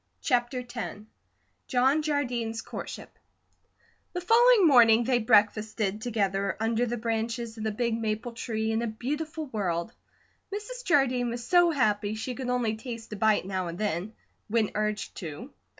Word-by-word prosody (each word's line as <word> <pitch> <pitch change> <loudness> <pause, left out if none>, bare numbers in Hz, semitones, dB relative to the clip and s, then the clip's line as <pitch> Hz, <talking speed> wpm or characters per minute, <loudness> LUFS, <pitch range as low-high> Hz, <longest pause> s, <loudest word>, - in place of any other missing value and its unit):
CHAPTER 245 0 0
X 240 -3 -6 0.7
JOHN 265 +4 +3
JARDINE'S 245 -7 -1
COURTSHIP - - -8 0.9
THE 360 - -3
following 455 0 +6
morning 235 -4 +6
they 245 0 +2
breakfasted 215 -1 +2
together 200 -4 -1
under 225 +2 +1
the 240 +1 -2
branches 230 0 -2
of 220 - -6
the 220 - 0
big 230 +1 -1
maple 220 +2 -2
tree 225 -1 -2
in 225 +1 0
a 235 - -1
beautiful 300 +8 -4
world. 200 - -2 0.6
Mrs. 430 +5 -6
Jardine 255 -6 +2
was 235 0 -5
so 350 +1 +5
happy 215 -8 +1
she 225 +4 -4
could 255 0 -5
only 240 -3 0
taste 225 -1 -7
a - - -3
bite 215 -1 +2
now 185 -2 -2
and 170 0 -6
then, 205 0 -2 0.3
when 220 -1 +1
urged 210 0 -2
to. 185 - -7
230 Hz, 150 wpm, -28 LUFS, 215-255 Hz, 0.9 s, following